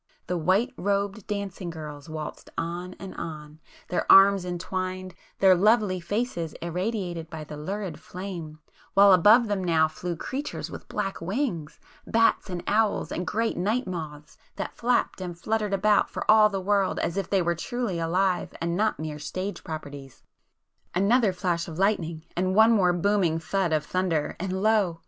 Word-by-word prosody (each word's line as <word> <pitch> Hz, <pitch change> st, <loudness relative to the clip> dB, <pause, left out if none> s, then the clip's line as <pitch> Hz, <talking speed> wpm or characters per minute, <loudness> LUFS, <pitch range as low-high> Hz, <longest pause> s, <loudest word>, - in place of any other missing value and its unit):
The 180 Hz, -, -2 dB
white 190 Hz, -, +1 dB
robed 200 Hz, +1 st, -1 dB
dancing 200 Hz, -3 st, -4 dB
girls 150 Hz, -2 st, -8 dB
waltzed 155 Hz, -1 st, -7 dB
on 175 Hz, +2 st, -4 dB
and 195 Hz, -1 st, -8 dB
on, 155 Hz, -2 st, -7 dB, 0.3 s
their 180 Hz, -, +1 dB
arms 195 Hz, -1 st, +7 dB
entwined, 185 Hz, +1 st, -4 dB, 0.2 s
their 190 Hz, -1 st, +6 dB
lovely 205 Hz, 0 st, +3 dB
faces 175 Hz, -3 st, -2 dB
irradiated 175 Hz, -1 st, -3 dB
by 160 Hz, -1 st, -7 dB
the 150 Hz, -, -9 dB
lurid 190 Hz, +5 st, -5 dB
flame, 175 Hz, -5 st, -7 dB, 0.4 s
while 200 Hz, 0 st, +8 dB
above 215 Hz, +7 st, +6 dB
them 205 Hz, -2 st, -1 dB
now 160 Hz, -3 st, +3 dB
flew 175 Hz, +2 st, -5 dB
creatures 270 Hz, -, -5 dB
with -, -, -9 dB
black 195 Hz, -3 st, -3 dB
wings, 175 Hz, -, -3 dB, 0.3 s
bats 225 Hz, -2 st, +2 dB
and 175 Hz, -2 st, -4 dB
owls, 215 Hz, 0 st, +1 dB
and 180 Hz, 0 st, -3 dB
great 225 Hz, +6 st, -1 dB
night 215 Hz, +8 st, 0 dB
moths, 155 Hz, -5 st, -7 dB, 0.2 s
that -, -, -5 dB
flapped 240 Hz, -4 st, 0 dB
and 175 Hz, -2 st, -5 dB
fluttered 215 Hz, +2 st, -1 dB
about 205 Hz, +1 st, +3 dB
for -, -, -5 dB
all 215 Hz, 0 st, +7 dB
the 195 Hz, -2 st, -3 dB
world 200 Hz, 0 st, +1 dB
as 170 Hz, -, -1 dB
if 195 Hz, -1 st, -2 dB
they 195 Hz, -3 st, +2 dB
were 170 Hz, 0 st, +1 dB
truly 205 Hz, +1 st, -3 dB
alive 180 Hz, +2 st, 0 dB
and 170 Hz, 0 st, -1 dB
not 215 Hz, +3 st, +1 dB
mere 155 Hz, -1 st, -5 dB
'stage 185 Hz, +7 st, -5 dB
properties.' 145 Hz, -5 st, -8 dB, 0.7 s
Another 210 Hz, +3 st, +3 dB
flash 180 Hz, -2 st, -2 dB
of 160 Hz, -2 st, -7 dB
lightning,—and 180 Hz, -1 st, -1 dB
one 220 Hz, +2 st, +7 dB
more 190 Hz, -6 st, +4 dB
booming 175 Hz, -2 st, +1 dB
thud 170 Hz, +2 st, -1 dB
of 155 Hz, -1 st, +1 dB
thunder,——and 185 Hz, +2 st, -1 dB
lo! 205 Hz, -6 st, +2 dB
185 Hz, 160 wpm, -26 LUFS, 165-205 Hz, 0.7 s, while